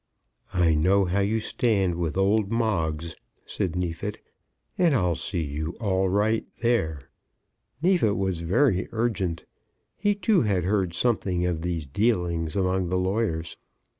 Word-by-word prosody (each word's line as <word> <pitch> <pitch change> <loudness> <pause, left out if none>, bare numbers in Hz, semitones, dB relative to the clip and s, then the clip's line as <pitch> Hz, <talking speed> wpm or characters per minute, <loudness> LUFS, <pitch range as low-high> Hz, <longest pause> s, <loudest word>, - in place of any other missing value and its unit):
"I 85 -2 +4
know 95 +6 +3
how 90 +3 0
you 105 +3 +1
stand 105 -5 +1
with 85 -1 -2
old 100 +2 +2
Moggs," 85 -8 -1 0.3
said 90 -3 -3
Neefit, 90 +3 -3 0.6
"and 170 -5 +3
I'll 90 -7 +2
see 85 +1 -3
you 80 +3 -4
all 95 -4 +1
right 105 +3 +1 0.2
there." 80 -12 +1 0.8
Neefit 170 - +3
was 95 -3 -1
very 95 - +1
urgent. 105 -7 -1 0.5
He 205 0 +1
too 205 0 +2
had 100 -5 +1
heard 95 -2 0
something 95 -7 0
of 85 -3 -1
these 85 -3 -2
dealings 85 - 0
among 95 -2 0
the 90 - 0
lawyers. 90 -3 -1
95 Hz, 135 wpm, -26 LUFS, 85-110 Hz, 0.8 s, I